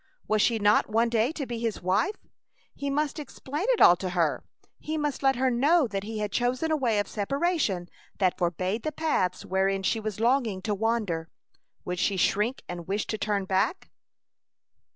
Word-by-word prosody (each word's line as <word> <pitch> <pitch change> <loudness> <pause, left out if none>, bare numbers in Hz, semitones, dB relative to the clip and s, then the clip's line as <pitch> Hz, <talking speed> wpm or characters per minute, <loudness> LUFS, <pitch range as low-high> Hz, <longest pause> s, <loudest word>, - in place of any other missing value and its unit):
Was 215 -1 +2
she 230 +1 +3
not 205 0 +3
one 230 +2 +2
day 230 +3 +2
to 295 -4 -4
be 240 -2 -5
his 230 -2 -2
wife? 205 - +1 0.6
He 280 - -4
must 295 +2 -1
explain 295 - -5
it - - +2
all 175 - +9
to 185 0 -3
her. 170 -4 0 0.4
He 310 +1 -3
must 295 -2 -2
let 270 -1 +3
her 260 +1 +1
know 290 +6 +3
that 200 -4 -3
he 215 +2 -6
had 210 -1 -2
chosen 255 +6 0
a - - +3
way 240 -7 +1
of 205 -1 0
separation 230 - -1 0.3
that 185 -3 +2
forbade 185 +5 -1
the 310 - -2
paths 290 - -1
wherein 195 +1 0
she 225 - +1
was 215 -2 -5
longing 230 -5 +1
to 215 - -1
wander. 205 -7 -1 0.6
Would 180 0 -3
she 200 0 +1
shrink 210 +7 +1
and 175 -1 -7
wish 200 +2 -1
to 220 - -4
turn 205 -3 -1
back? 190 - -1
220 Hz, 190 wpm, -27 LUFS, 195-270 Hz, 0.6 s, all